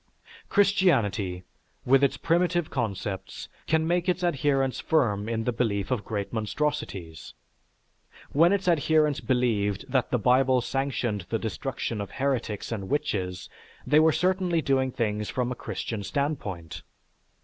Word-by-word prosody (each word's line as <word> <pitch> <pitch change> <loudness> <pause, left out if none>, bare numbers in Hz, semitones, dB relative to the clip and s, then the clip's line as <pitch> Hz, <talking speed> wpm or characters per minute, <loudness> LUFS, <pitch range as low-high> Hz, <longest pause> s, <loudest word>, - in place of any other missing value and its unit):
Christianity, 110 - +2 0.4
with 135 +2 +5
its 140 - +2
primitive 175 -1 +1
concepts, 100 -6 -4 0.2
can 160 0 +2
make 175 +1 +1
its 180 0 0
adherents 135 -5 +1
firm 110 -9 +1
in 115 -1 -1
the 125 - 0
belief 110 -4 -1
of 120 -5 0
great 100 -1 -4
monstrosities. 105 - -3 1.0
When 165 +5 +5
its 200 -2 0
adherents 155 -3 +3
believed 110 -6 0
that 130 -3 +1
the 125 - +1
Bible 130 +3 +3
sanctioned 120 -8 -2
the 115 - 0
destruction 115 0 -3
of 100 - -5
heretics 130 -7 -2
and 100 -4 -4
witches, 95 - -2 0.4
they 150 - +5
were 160 0 +5
certainly 180 0 +1
doing 135 -3 +1
things 105 -3 -2
from 125 -1 -1
a - - -3
Christian 110 -2 -4
standpoint. 100 - -3
125 Hz, 135 wpm, -27 LUFS, 105-150 Hz, 1.0 s, with